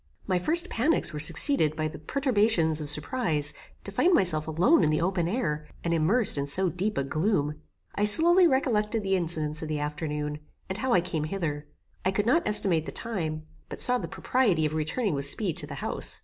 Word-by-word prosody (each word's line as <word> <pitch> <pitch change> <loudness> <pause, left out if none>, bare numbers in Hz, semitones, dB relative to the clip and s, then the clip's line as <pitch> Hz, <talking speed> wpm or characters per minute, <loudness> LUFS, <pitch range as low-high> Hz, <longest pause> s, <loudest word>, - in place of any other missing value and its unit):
My 185 -2 0
first 340 - +2
panics 290 - 0
were 150 - -5
succeeded 155 - +4
by 155 -1 -2
the 155 -1 -9
perturbations 205 - 0
of 150 - 0
surprize, 150 - -1 0.3
to - - -7
find 360 0 +2
myself 155 -5 +2
alone 180 - +2
in - - +2
the 155 - 0
open 175 0 -1
air, 155 -8 -3 0.2
and 170 - -1
immersed 175 - +2
in 140 - -3
so 185 +6 +1
deep 200 +4 -3
a 140 - 0
gloom. 155 +1 -1 0.4
I 205 - 0
slowly 340 - +7
recollected 225 -6 -1
the 195 0 0
incidents 160 -4 -3
of 160 - -5
the 155 -1 -3
afternoon, 150 0 -4 0.3
and 190 - -5
how 260 -2 -1
I 180 - +3
came 165 -4 -4
hither. 155 -4 -5 0.4
I - - +1
could 205 +2 -1
not 270 +9 +1
estimate 185 -6 0
the - - -5
time, 160 -9 -4 0.2
but - - -8
saw 250 0 +4
the - - -6
propriety 205 -12 0
of 155 - -3
returning 160 +7 -2
with 140 0 -3
speed 185 -1 -1
to 145 - -2
the 145 - -8
house. - - -1
175 Hz, 205 wpm, -26 LUFS, 155-220 Hz, 0.4 s, slowly